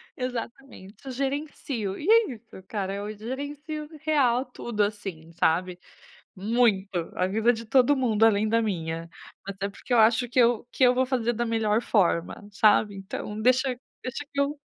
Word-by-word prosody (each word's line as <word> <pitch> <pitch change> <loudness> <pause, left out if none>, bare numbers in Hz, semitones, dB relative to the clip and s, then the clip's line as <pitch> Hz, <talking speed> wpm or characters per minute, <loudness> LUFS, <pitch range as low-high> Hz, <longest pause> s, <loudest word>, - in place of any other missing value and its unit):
Exatamente, 245 -4 -6
eu 265 - -5
gerencio, 270 -6 -3
e 310 - -6
é 450 -7 +5
isso 220 -4 -14
cara, 195 -3 -3
eu 205 +2 -5
gerencio 290 +6 -6
real 265 -5 +2
tudo 240 -3 -4
assim, 195 -6 -5
sabe, 175 +3 0 0.6
muito, 205 -1 +2 0.3
a - - +1
vida 220 +5 +2
de 230 0 -7
todo 260 +4 +4
mundo, 225 -5 +3
além 215 -1 +3
da 230 +1 +2
minha. 165 -5 -3 0.4
Até 200 0 -4
porque 225 +5 -6
eu 240 - +5
acho 225 +2 +4
que 255 - +1
eu 235 -1 +3
que 260 - 0
eu 250 0 +6
vou 260 +1 +2
fazer 245 -2 0
da 240 +1 -1
melhor 225 -1 +1
forma, 190 -2 0
sabe. 210 0 +3
Então 205 +2 -6
deixa 255 +2 +2 0.2
deixa 260 +3 -5
que 280 - -2
eu 280 +1 0
230 Hz, 165 wpm, -26 LUFS, 205-255 Hz, 0.6 s, eu